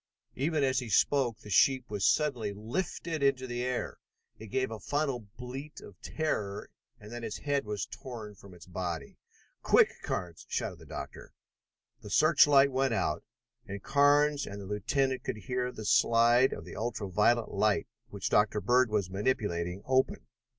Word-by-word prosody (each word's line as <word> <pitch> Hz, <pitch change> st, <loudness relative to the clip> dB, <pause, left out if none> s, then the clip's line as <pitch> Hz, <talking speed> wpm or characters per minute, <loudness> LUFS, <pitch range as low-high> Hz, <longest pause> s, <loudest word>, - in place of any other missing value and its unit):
Even 150 Hz, +2 st, 0 dB
as 130 Hz, -1 st, +2 dB
he 125 Hz, -3 st, -6 dB
spoke 125 Hz, -1 st, +2 dB
the 105 Hz, -, -10 dB
sheep 130 Hz, +5 st, +4 dB
was 100 Hz, -2 st, -4 dB
suddenly 125 Hz, -9 st, +1 dB
lifted 155 Hz, -, -4 dB
into 135 Hz, -2 st, +2 dB
the 120 Hz, -1 st, -4 dB
air. 125 Hz, 0 st, -3 dB, 0.4 s
It 110 Hz, -, -9 dB
gave 130 Hz, +2 st, -1 dB
a 110 Hz, -, -6 dB
final 140 Hz, +3 st, -1 dB, 0.2 s
bleat 135 Hz, +5 st, -7 dB
of 100 Hz, -, -14 dB
terror, 105 Hz, -10 st, -3 dB, 0.3 s
and 105 Hz, +1 st, -12 dB
then 120 Hz, 0 st, -6 dB
its 105 Hz, -, -4 dB
head 145 Hz, -3 st, -1 dB
was 105 Hz, -1 st, -3 dB
torn 115 Hz, -5 st, -8 dB
from 100 Hz, -1 st, -15 dB
its 85 Hz, -, -14 dB
body. 90 Hz, -2 st, -5 dB, 0.4 s
"Quick, -, -, +5 dB
Carnes!" 85 Hz, -2 st, -4 dB
shouted -, -, -3 dB
the -, -, -14 dB
doctor. -, -, -8 dB, 0.7 s
The -, -, -10 dB
search -, -, +5 dB
light 140 Hz, -1 st, +5 dB
went 130 Hz, -2 st, +1 dB
out, 75 Hz, -, -1 dB, 0.4 s
and 100 Hz, 0 st, -7 dB
Carnes 145 Hz, +1 st, +3 dB
and 100 Hz, +1 st, -7 dB
the 100 Hz, -, -8 dB
lieutenant 130 Hz, +7 st, -1 dB
could -, -, -3 dB
hear 125 Hz, +4 st, -2 dB
the 110 Hz, -3 st, -8 dB
slide 120 Hz, +4 st, +4 dB
of -, -, -6 dB
the -, -, -9 dB
ultra 110 Hz, -3 st, -3 dB
violet 110 Hz, +5 st, +2 dB
light 100 Hz, -3 st, +1 dB, 0.2 s
which 100 Hz, -2 st, -4 dB
Dr. 105 Hz, 0 st, +3 dB
Bird 125 Hz, +2 st, +3 dB
was 100 Hz, -4 st, -1 dB
manipulating 95 Hz, -4 st, -1 dB
open. 130 Hz, 0 st, +1 dB
120 Hz, 170 wpm, -30 LUFS, 105-135 Hz, 0.7 s, Quick